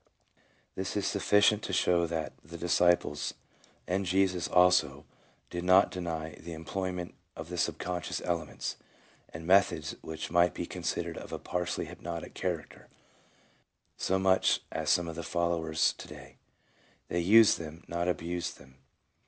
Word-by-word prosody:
1 - - -37 0.7
This 95 +2 -2
is 100 - 0
sufficient 105 +1 +3
to - - -5
show 85 -1 +3
that 80 -2 -3
the 85 +3 -9
disciples, 85 -3 +2 0.5
and 95 +2 0
Jesus 95 -1 +1
also, 90 0 +3 0.5
did 90 0 -3
not 95 +2 +5
deny 80 -3 -4
the 85 +1 -8
employment 90 +2 -4 0.2
of 80 +1 -8
the 90 - -5
subconscious 90 -2 -2
elements, 85 -3 -3 0.5
and 80 +1 -9
methods 90 -4 +3
which 80 0 -6
might 85 -1 +4
be - - -3
considered - - -3
of - - -10
a - - -3
partially 90 0 -2
hypnotic 85 -1 -7
character, 85 -4 -4 1.1
so 95 - 0
much 95 0 +3
as 80 -1 -2
some 85 0 +3
of 80 -1 -6
his 85 - -5
followers 85 -2 +1
to - - -11
day. - - -12 0.7
They 85 - 0
used 105 +5 +6
them, 80 +1 -8
not 85 +1 -2
abused 85 0 -2
them. 65 0 -18
85 Hz, 145 wpm, -30 LUFS, 80-90 Hz, 1.1 s, used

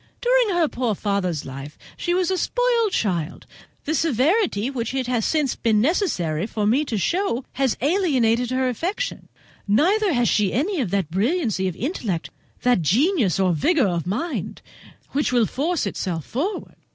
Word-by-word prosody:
During 485 -6 +2
her 330 -3 +3
poor 240 -6 -1
father's 190 -6 -1
life 140 +3 -8 0.2
she 350 0 -1
was 370 0 +1
a 375 - +1
spoilt 475 0 +1
child; 175 - -2 0.4
the 310 - -1
severity 300 - +1
which 245 -1 -3
it 260 -1 0
has 240 -3 0
since 300 -5 +1
been 220 -2 +2
necessary 210 - 0
for 215 -2 -2
me 245 +8 +3
to 230 -6 -2
show 335 - 0
has 265 -2 0
alienated 255 - +2
her 260 0 0
affection; 365 - -3 0.4
neither 370 - +3
has 240 -2 +2
she 205 -3 +2
any 325 - 0
of 220 - -2
that 190 -4 -1
brilliancy 220 - 0
of 180 - -3
intellect, 220 - -3 0.3
that 245 -7 +3
genius 225 - +2
or 185 -2 +3
vigour 275 - +2
of 170 -1 -2
mind 300 - -3 0.5
which 290 0 0
will 240 -3 +3
force 315 - -1
itself 175 -5 -3
forward." 345 - -4
250 Hz, 165 wpm, -23 LUFS, -, 0.5 s, her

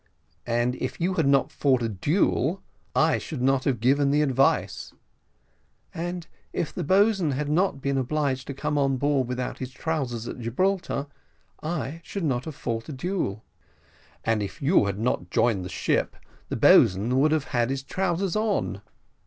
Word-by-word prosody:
"And 120 +1 +1
if 130 - -4
you 180 +3 +1
had 160 -6 +1
not 140 -1 +3
fought 130 -4 +2
a - - +1
duel, 150 - 0 0.3
I 155 0 +3
should 135 -6 -5
not 135 0 +2
have 130 -6 +1
given 140 +4 +3
the 150 +2 +3
advice." 135 -1 +1 1.0
"And 175 +1 -4 0.3
if 155 - -3
the - - -3
boatswain 190 -2 +3
had 145 +2 -2
not 160 -2 +1
been 140 -1 +1
obliged 135 -1 -1
to 140 - -5
come 145 +2 -1
on 135 -1 +2
board 140 -2 +1
without 125 0 -4
his 130 - -4
trousers, 130 -5 -3
at - - -6
Gibraltar, 145 - -1 0.6
I 155 -1 -3
should 195 +1 -5
not 130 -5 0
have 155 - -6
fought 120 -5 -4
a - - -4
duel." 135 - -3 0.8
"And 115 -2 +1
if 100 +8 -5
you 145 - +3
had 100 -1 -2
not 105 -6 -1
joined 105 -2 +2
the 90 - -6
ship, - - 0 0.3
the - - -2
boatswain 110 +8 +5
would 150 +3 +4
have 155 -2 0
had 120 -1 +2
his 135 0 -2
trousers 185 +3 -1
on." 210 - 0
140 Hz, 170 wpm, -26 LUFS, 125-160 Hz, 1.0 s, boatswain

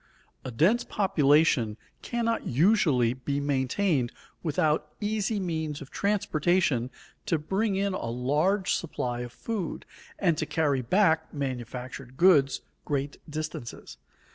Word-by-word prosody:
A - - -5
dense 170 - +3
population 145 - +2 0.2
cannot 230 -1 -1
usually 140 - +3
be 140 +2 -3
maintained 140 0 0 0.3
without 155 -1 +1
easy 210 0 -1
means 160 -5 -3
of 140 -4 -11
transportation 175 - +1 0.4
to 170 -6 +2
bring 195 +7 -1
in 200 0 0
a 150 - -3
large 150 - +1
supply 125 -7 -2
of 120 -1 -5
food, 205 - -4 0.3
and 170 -6 +1
to - - -1
carry 145 -5 +1
back 160 - +2
manufactured 130 -1 -5
goods 155 -7 +5 0.2
great 140 0 -2
distances. 155 -6 -6
155 Hz, 115 wpm, -28 LUFS, 130-190 Hz, 0.4 s, goods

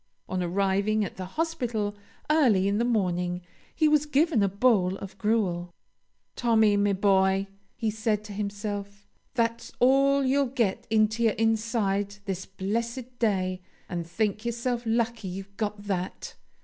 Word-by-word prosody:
On 185 -1 -2
arriving 200 +4 +1
at - - -8
the 185 -1 -5
hospital 240 -11 -1 0.3
early 245 -12 +4
in 200 +1 +1
the - - +2
morning, 180 -6 0 0.3
he 315 - +3
was 300 0 +3
given 295 -4 +3
a 200 - +3
bowl 200 -3 +3
of 195 -1 -9
gruel. 180 -6 0 0.6
"'Tommy, 220 -3 +3
me 205 0 +2
boy,' 195 0 +3 0.3
he 225 -3 -1
said 215 -1 -1
to 210 -1 -8
himself, 205 0 -5 0.3
'that's 230 -1 -1
all 275 +2 +4
you'll 275 +1 +2
get 235 -6 -1
into 220 +1 +2
your 225 -2 +4
inside 215 -3 0
this 190 -1 -4
blessed 235 +6 -4
day, 185 -5 0 0.3
and 170 -2 -4
think 210 +4 -1
yourself 235 +1 -1
lucky 230 -2 0
you've 195 +2 -7
got 210 -1 -3
that.' 190 -3 -4
210 Hz, 145 wpm, -27 LUFS, 195-235 Hz, 0.6 s, early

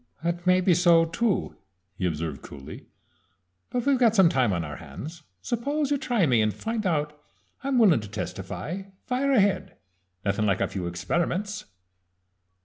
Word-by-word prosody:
"That 170 +1 -2
may 185 0 +5
be 180 0 +4
so 170 -1 +5
too," 190 +5 -1 0.4
he 90 0 -1
observed 80 -3 -3
coolly. 70 -2 -10 0.8
"But 245 -1 -2
we've 275 -2 +3
got 230 -3 +4
some 190 -5 +6
time 130 -7 +2
on 85 -3 -1
our 75 -2 -6
hands 140 - -9 0.2
suppose 280 +5 -1
you 285 - +2
try 235 -9 +1
me 120 -6 +3
and 110 0 +2
find 215 - -3
out. 150 -3 -1 0.4
I'm 270 -1 +1
willin' 200 - +6
to 105 -2 -8
testify. 95 - -5 0.2
Fire 260 +3 0
ahead 205 -6 +2 0.5
nothin' 100 +2 +1
like 100 -2 +2
a - - +1
few 90 -3 -4
experiments." 175 - -2
170 Hz, 160 wpm, -26 LUFS, -, 0.8 s, some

